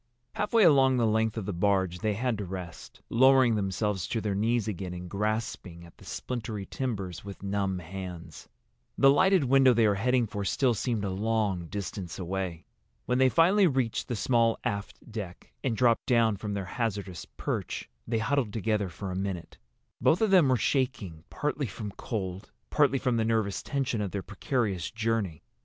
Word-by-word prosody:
Halfway 215 Hz, +1 st, +2 dB
along 135 Hz, -6 st, +5 dB
the 120 Hz, -, +2 dB
length 110 Hz, 0 st, +1 dB
of 110 Hz, -, -3 dB
the 100 Hz, -, -3 dB
barge 95 Hz, -1 st, +1 dB
they 105 Hz, 0 st, 0 dB
had 120 Hz, -1 st, -1 dB
to -, -, -2 dB
rest, 90 Hz, -3 st, -8 dB
lowering 130 Hz, 0 st, +5 dB
themselves 100 Hz, -2 st, -1 dB
to 115 Hz, -, -1 dB
their 105 Hz, -2 st, -1 dB
knees 115 Hz, +3 st, +1 dB
again 90 Hz, -3 st, -4 dB
and 90 Hz, 0 st, -7 dB
grasping 100 Hz, -4 st, -3 dB
at 85 Hz, -, -16 dB
the -, -, -15 dB
splintery 110 Hz, -5 st, -4 dB
timbers 100 Hz, -10 st, -4 dB
with 100 Hz, -1 st, -9 dB
numb 100 Hz, -1 st, -1 dB
hands. 90 Hz, -2 st, -8 dB, 0.5 s
The 135 Hz, 0 st, +7 dB
lighted 190 Hz, +4 st, +4 dB
window 135 Hz, -1 st, +5 dB
they 115 Hz, -1 st, +4 dB
were 105 Hz, -, +3 dB
heading 125 Hz, +4 st, +2 dB
for 105 Hz, -1 st, -4 dB
still 125 Hz, +5 st, +2 dB
seemed 115 Hz, -2 st, -1 dB
a 95 Hz, -, -2 dB
long 100 Hz, -3 st, 0 dB
distance 95 Hz, -2 st, -5 dB
away. 90 Hz, -2 st, -4 dB, 0.4 s
When 125 Hz, +1 st, +1 dB
they 130 Hz, 0 st, +5 dB
finally 185 Hz, +7 st, +5 dB
reached 130 Hz, -6 st, -1 dB
the 120 Hz, -, -2 dB
small 115 Hz, 0 st, +2 dB
aft 105 Hz, -1 st, -4 dB
deck, 100 Hz, -5 st, -7 dB
and 120 Hz, -5 st, 0 dB
dropped 120 Hz, -2 st, +3 dB
down 115 Hz, -4 st, +3 dB
from 105 Hz, +1 st, -4 dB
their 100 Hz, -2 st, -3 dB
hazardous 100 Hz, -4 st, -3 dB
perch, -, -, -3 dB, 0.2 s
they 115 Hz, -, 0 dB
huddled 115 Hz, 0 st, 0 dB
together 105 Hz, -3 st, 0 dB
for 95 Hz, +3 st, -6 dB
a -, -, -4 dB
minute. 95 Hz, -2 st, -4 dB, 0.4 s
Both 165 Hz, -, +3 dB
of 220 Hz, -3 st, +3 dB
them 175 Hz, -8 st, +6 dB
were 130 Hz, -, +4 dB
shaking, 105 Hz, -, -1 dB
partly 145 Hz, -2 st, -2 dB
from 105 Hz, 0 st, -6 dB
cold, 95 Hz, -3 st, -5 dB, 0.2 s
partly 145 Hz, -2 st, +3 dB
from 125 Hz, -2 st, 0 dB
the 115 Hz, -, +2 dB
nervous 110 Hz, -4 st, 0 dB
tension 135 Hz, -5 st, -1 dB
of 100 Hz, -, -2 dB
their 100 Hz, 0 st, -4 dB
precarious 100 Hz, -, -2 dB
journey. 110 Hz, -8 st, -2 dB
110 Hz, 180 wpm, -28 LUFS, 95-125 Hz, 0.5 s, The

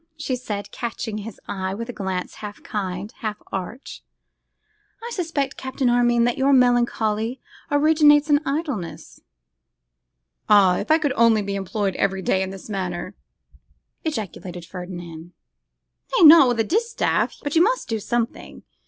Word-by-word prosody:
she 290 Hz, -4 st, -2 dB
said, 205 Hz, -5 st, -5 dB
catching 225 Hz, -2 st, -4 dB
his 210 Hz, 0 st, -9 dB
eye 190 Hz, -1 st, -3 dB
with 230 Hz, +2 st, -5 dB
a 245 Hz, -, -6 dB
glance 190 Hz, -3 st, -4 dB
half 210 Hz, -1 st, -8 dB
kind, 195 Hz, 0 st, -4 dB
half 215 Hz, -2 st, -4 dB
arch. 195 Hz, +8 st, -6 dB, 1.0 s
'I 475 Hz, -, -6 dB
suspect, 320 Hz, -9 st, -2 dB
Captain 260 Hz, -1 st, -1 dB
Armine, 240 Hz, -1 st, +3 dB
that 245 Hz, +2 st, 0 dB
your 275 Hz, +1 st, +3 dB
melancholy 240 Hz, -2 st, +2 dB, 0.3 s
originates 295 Hz, 0 st, +5 dB
in 290 Hz, -2 st, +4 dB
idleness.' 275 Hz, -, -4 dB, 1.3 s
'Ah! 195 Hz, -4 st, +6 dB
if -, -, -5 dB
I 315 Hz, -, +6 dB
could 295 Hz, -4 st, 0 dB
only 230 Hz, -3 st, +4 dB
be 200 Hz, 0 st, -4 dB
employed 195 Hz, 0 st, -2 dB
every 195 Hz, -1 st, 0 dB
day 190 Hz, +2 st, +1 dB
in 190 Hz, -, -2 dB
this 190 Hz, -1 st, -9 dB
manner!' 185 Hz, -2 st, -4 dB, 0.9 s
ejaculated 190 Hz, -, -5 dB
Ferdinand. 175 Hz, -2 st, -9 dB, 0.8 s
'Nay! 350 Hz, -, +7 dB
not 305 Hz, -3 st, +9 dB
with 240 Hz, -2 st, 0 dB
a -, -, +4 dB
distaff; 450 Hz, -, 0 dB
but 290 Hz, +1 st, -3 dB
you 325 Hz, -, +5 dB
must 485 Hz, +7 st, +1 dB
do 225 Hz, -1 st, -2 dB
something. 235 Hz, +2 st, -3 dB
225 Hz, 145 wpm, -23 LUFS, 195-275 Hz, 1.3 s, not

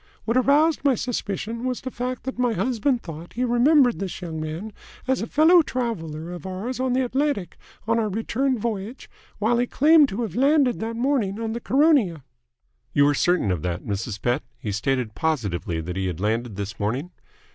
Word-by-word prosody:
What 230 Hz, -, 0 dB
aroused 290 Hz, +5 st, +3 dB
my 275 Hz, -3 st, +4 dB
suspicion 230 Hz, -1 st, -3 dB
was 255 Hz, -1 st, -2 dB
the 260 Hz, -, -5 dB
fact 250 Hz, +1 st, -4 dB
that 265 Hz, -1 st, -5 dB
my 245 Hz, -2 st, +2 dB
husband 240 Hz, +4 st, 0 dB
thought 160 Hz, -3 st, -7 dB
that -, -, -21 dB
he 250 Hz, +3 st, 0 dB
remembered 245 Hz, +1 st, +4 dB
this 195 Hz, -2 st, -4 dB
young 165 Hz, -3 st, -5 dB
man 165 Hz, +8 st, -5 dB, 0.3 s
as 260 Hz, 0 st, +1 dB
a 225 Hz, -, -3 dB
fellow 330 Hz, +6 st, +6 dB
traveller 175 Hz, -, -4 dB
of 180 Hz, +1 st, -7 dB
ours 210 Hz, +8 st, -4 dB
on 260 Hz, -1 st, 0 dB
the 260 Hz, 0 st, +2 dB
Atlantic, 265 Hz, -7 st, -1 dB, 0.3 s
on 230 Hz, 0 st, +2 dB
our 215 Hz, -2 st, 0 dB
return 245 Hz, +6 st, 0 dB
voyage, 220 Hz, +2 st, -4 dB, 0.3 s
while 230 Hz, +3 st, +1 dB
he 245 Hz, -, +1 dB
claimed 300 Hz, +1 st, +5 dB
to 220 Hz, +5 st, -3 dB
have 200 Hz, -6 st, -5 dB
landed 275 Hz, -1 st, +3 dB
that 225 Hz, +1 st, -3 dB
morning 235 Hz, -5 st, 0 dB
on 225 Hz, -1 st, -2 dB
the 235 Hz, -, -4 dB
Caronia." 260 Hz, -, +3 dB, 0.7 s
"You 145 Hz, -, +5 dB
are -, -, +2 dB
certain 175 Hz, -, +2 dB
of 90 Hz, -4 st, -1 dB
that, 90 Hz, 0 st, -3 dB
Mrs. 105 Hz, +1 st, -4 dB
Pett? 120 Hz, +6 st, 0 dB, 0.2 s
He 105 Hz, -, -4 dB
stated 120 Hz, +2 st, -1 dB
positively 105 Hz, -, -1 dB
that 90 Hz, +2 st, -5 dB
he 95 Hz, -1 st, -1 dB
had 90 Hz, -3 st, -4 dB
landed 110 Hz, +2 st, -1 dB
this 100 Hz, +2 st, -5 dB
morning?" 125 Hz, -, -2 dB
220 Hz, 195 wpm, -24 LUFS, 155-255 Hz, 0.7 s, fellow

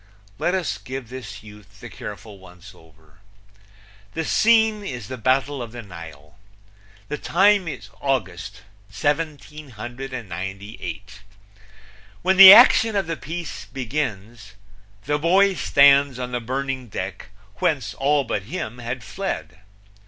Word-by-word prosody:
Let 180 Hz, -, 0 dB
us 185 Hz, -3 st, -2 dB
give 130 Hz, -2 st, -7 dB
this 110 Hz, -6 st, -9 dB
youth 105 Hz, -1 st, -15 dB
the -, -, -9 dB
careful 105 Hz, 0 st, -9 dB
once 90 Hz, -1 st, -15 dB
over: 80 Hz, -2 st, -22 dB, 1.0 s
The 160 Hz, 0 st, -2 dB
scene 220 Hz, -2 st, +3 dB
is 125 Hz, -, -6 dB
the 130 Hz, -, -4 dB
Battle 130 Hz, +3 st, 0 dB
of 115 Hz, -1 st, -8 dB
the 120 Hz, -1 st, -8 dB
Nile. 80 Hz, -4 st, -12 dB, 0.7 s
The 150 Hz, -, -5 dB
time 195 Hz, +1 st, +3 dB
is 155 Hz, -, -7 dB
August, 105 Hz, -6 st, -3 dB, 0.3 s
1798. 120 Hz, -, -5 dB, 1.0 s
When 190 Hz, +1 st, +2 dB
the 190 Hz, -1 st, +13 dB
action 225 Hz, 0 st, +7 dB
of 195 Hz, -2 st, +1 dB
the 165 Hz, +1 st, -3 dB
piece 165 Hz, +2 st, -7 dB
begins 115 Hz, -5 st, -5 dB, 0.5 s
the 145 Hz, +1 st, 0 dB
boy 190 Hz, +5 st, +4 dB
stands 140 Hz, -5 st, +4 dB
on 125 Hz, -1 st, -5 dB
the 125 Hz, -, -2 dB
burning 130 Hz, +1 st, -4 dB
deck 95 Hz, -2 st, -6 dB, 0.3 s
whence 135 Hz, 0 st, -1 dB
all 140 Hz, +1 st, +1 dB
but 110 Hz, -4 st, -3 dB
him 125 Hz, -9 st, -5 dB
had 120 Hz, 0 st, -5 dB
fled. 95 Hz, -, -5 dB
130 Hz, 125 wpm, -22 LUFS, 105-150 Hz, 1.0 s, the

